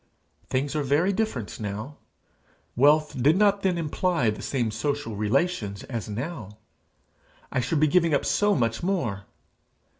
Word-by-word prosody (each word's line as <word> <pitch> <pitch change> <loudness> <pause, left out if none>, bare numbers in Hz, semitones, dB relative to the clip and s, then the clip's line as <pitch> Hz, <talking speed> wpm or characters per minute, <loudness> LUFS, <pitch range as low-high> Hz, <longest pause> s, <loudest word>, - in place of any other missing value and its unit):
Things 135 +3 -1
are 150 - +1
very 150 +8 +2
different 190 - -3
now! 110 +7 -5 0.8
Wealth 150 +1 +3
did 150 +7 +4
not 200 -1 +3
then 185 -3 +1
imply 165 -5 0
the 105 - -7
same 120 -5 -1
social 140 +1 -2
relations 105 - -1
as 115 -5 -5
now! 110 - -6 0.9
I - - 0
should 135 +6 0
be 155 - +5
giving 170 +1 +3
up 145 - +1
so 205 0 +2
much 115 -3 0
more! 130 - -2
140 Hz, 145 wpm, -26 LUFS, 115-170 Hz, 0.9 s, be